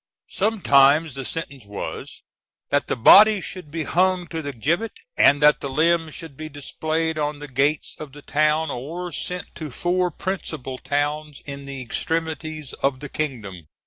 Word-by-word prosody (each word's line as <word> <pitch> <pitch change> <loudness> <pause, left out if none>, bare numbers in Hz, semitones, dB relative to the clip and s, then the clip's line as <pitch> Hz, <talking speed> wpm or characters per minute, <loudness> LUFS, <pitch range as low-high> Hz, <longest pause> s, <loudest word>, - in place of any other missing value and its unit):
Sometimes 155 - +4
the 135 - -5
sentence 140 -3 -5
was, 100 0 -7 0.5
that 145 0 +2
the - - 0
body 210 - +8
should 185 -4 -8
be 160 +2 -3
hung 180 +3 +2
to 165 -1 -3
the 145 -2 -4
gibbet, 165 - -1 0.2
and 145 +1 +5
that 150 0 +6
the 140 - -3
limbs 160 +2 +1
should 165 -5 -9
be 155 +2 -7
displayed 155 +2 -2
on 150 0 -1
the 145 0 -8
gates 140 +3 0
of 150 -3 -8
the 145 +1 -13
town, 155 +1 +1
or 170 +8 -5
sent 180 +4 -4
to 155 -2 -6
four 180 +6 0
principal 155 -7 -5
towns 145 0 -2
in 140 -1 -7
the 135 -2 -5
extremities 155 +2 -3
of 135 -1 +1
the 150 - -7
kingdom. 105 - -5
150 Hz, 165 wpm, -23 LUFS, 140-165 Hz, 0.5 s, body